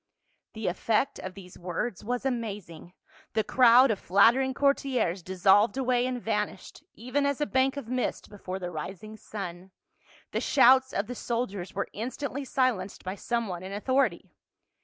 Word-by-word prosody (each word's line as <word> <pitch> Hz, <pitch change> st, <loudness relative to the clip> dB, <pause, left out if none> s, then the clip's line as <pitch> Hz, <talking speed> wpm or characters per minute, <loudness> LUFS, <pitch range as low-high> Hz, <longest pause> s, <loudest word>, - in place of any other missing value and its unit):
The 220 Hz, -1 st, -6 dB
effect 220 Hz, +9 st, 0 dB
of 185 Hz, 0 st, -7 dB
these 180 Hz, -2 st, -12 dB
words 180 Hz, +4 st, -4 dB
was 245 Hz, +4 st, -3 dB
am.azing; 205 Hz, -9 st, -4 dB, 0.4 s
the 220 Hz, -, +1 dB
crowd 250 Hz, +2 st, +6 dB
of 205 Hz, -, -2 dB
flattering 240 Hz, +8 st, +4 dB
courtiers 270 Hz, -10 st, +1 dB
dissolved 190 Hz, +6 st, +3 dB
away 250 Hz, -1 st, +1 dB
and 255 Hz, -1 st, -3 dB
vanished, 210 Hz, -4 st, -3 dB
even 255 Hz, +5 st, -1 dB
as 280 Hz, 0 st, 0 dB
a 295 Hz, -, +1 dB
bank 265 Hz, 0 st, +1 dB
of 280 Hz, -, -6 dB
mist 255 Hz, +1 st, -2 dB
before 190 Hz, -2 st, -6 dB
the 180 Hz, -2 st, -5 dB
rising 190 Hz, +7 st, -7 dB
sun; 190 Hz, -4 st, -7 dB, 0.6 s
the -, -, -1 dB
shouts 260 Hz, -1 st, +5 dB
of 200 Hz, -, -1 dB
the 245 Hz, -, -6 dB
soldiers 230 Hz, -7 st, -3 dB
were 200 Hz, -, -2 dB
instantly 260 Hz, +5 st, -4 dB
silenced 245 Hz, -8 st, -1 dB
by 185 Hz, -, -4 dB
some 235 Hz, +3 st, -2 dB
one 180 Hz, -2 st, -5 dB
in 190 Hz, +1 st, -7 dB
authority. 210 Hz, -5 st, 0 dB
225 Hz, 160 wpm, -28 LUFS, 190-255 Hz, 0.6 s, crowd